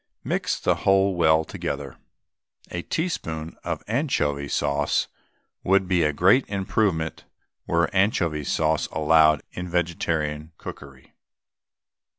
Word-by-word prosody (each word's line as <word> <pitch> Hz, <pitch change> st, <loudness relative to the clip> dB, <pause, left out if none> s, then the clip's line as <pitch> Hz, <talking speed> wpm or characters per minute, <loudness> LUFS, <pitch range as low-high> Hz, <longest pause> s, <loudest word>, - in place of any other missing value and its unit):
Mix -, -, -1 dB
the -, -, +1 dB
whole 95 Hz, 0 st, +3 dB
well 80 Hz, -2 st, +3 dB
together. 70 Hz, -3 st, -5 dB, 0.8 s
N.B. -, -, -4 dB
A -, -, -3 dB
teaspoonful 80 Hz, -, -4 dB
of 85 Hz, -2 st, -3 dB
anchovy 75 Hz, -, 0 dB
sauce 70 Hz, 0 st, 0 dB, 0.6 s
would 95 Hz, 0 st, +3 dB
be 90 Hz, -1 st, +2 dB
a 75 Hz, -1 st, +2 dB
great 95 Hz, -, +4 dB
improvement 95 Hz, -4 st, -1 dB, 0.4 s
were -, -, +2 dB
anchovy 85 Hz, -6 st, +1 dB
sauce 80 Hz, +2 st, 0 dB
allowed 75 Hz, -1 st, +4 dB
in 90 Hz, 0 st, -6 dB
vegetarian 80 Hz, -3 st, -2 dB
cookery. 70 Hz, -2 st, -11 dB
80 Hz, 115 wpm, -24 LUFS, 75-95 Hz, 0.8 s, great